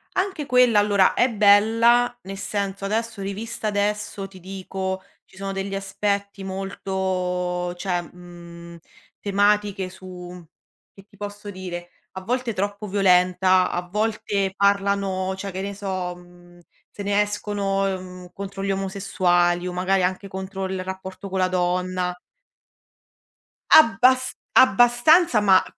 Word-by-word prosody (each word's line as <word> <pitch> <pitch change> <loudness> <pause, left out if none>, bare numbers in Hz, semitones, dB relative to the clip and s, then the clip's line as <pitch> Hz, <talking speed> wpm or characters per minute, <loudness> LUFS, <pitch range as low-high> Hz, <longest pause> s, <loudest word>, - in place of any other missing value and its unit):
Anche 370 -6 -1
quella 250 -4 +4
allora 205 -2 +3
è 250 - +3
bella, 225 +4 +4
nel 195 +1 -7
senso, 200 -1 -3
adesso 220 +1 -2
rivista 210 +3 -4
adesso 210 -1 -2
ti 190 -1 -15
dico 190 0 -5 0.2
ci - - -22
sono 195 0 -4
degli 195 +1 -4
aspetti 200 0 -2
molto 185 -2 -2
cioè, 180 -1 -2
mhmm, 170 0 -12 0.4
tematiche 205 -1 +1
su 180 -1 -10 0.5
che 195 - -16
ti 205 - -22
posso 205 +1 -7
dire, 180 -2 -7 0.2
a 190 - -6
volte 250 +1 -1
troppo 205 +1 -3
violenta, 185 -1 +3
a 175 0 -3
volte 205 -1 -1
parlano, 200 -1 +1
cioè 195 +1 -5
che 190 - -4
ne 200 +1 -4
so, 190 -3 -4
mhmm, 175 0 -18 0.3
se 205 - -8
ne 200 +1 +2
escono, 205 -1 -1
mhmm, 180 -1 -10
contro 195 0 -6
gli 195 - 0
omosessuali 185 -2 +1
o 180 - -3
magari 185 +1 +1
anche 185 +2 -1
contro 190 0 -5
il 190 0 -3
rapporto 190 +1 -7
con 190 0 -2
la 185 - +3
donna. 180 0 -1 1.6
Abbas 255 -2 +6 0.2
abbastanza, 245 +4 +5
ma 195 -2 +5
195 Hz, 130 wpm, -23 LUFS, 185-205 Hz, 1.6 s, Abbas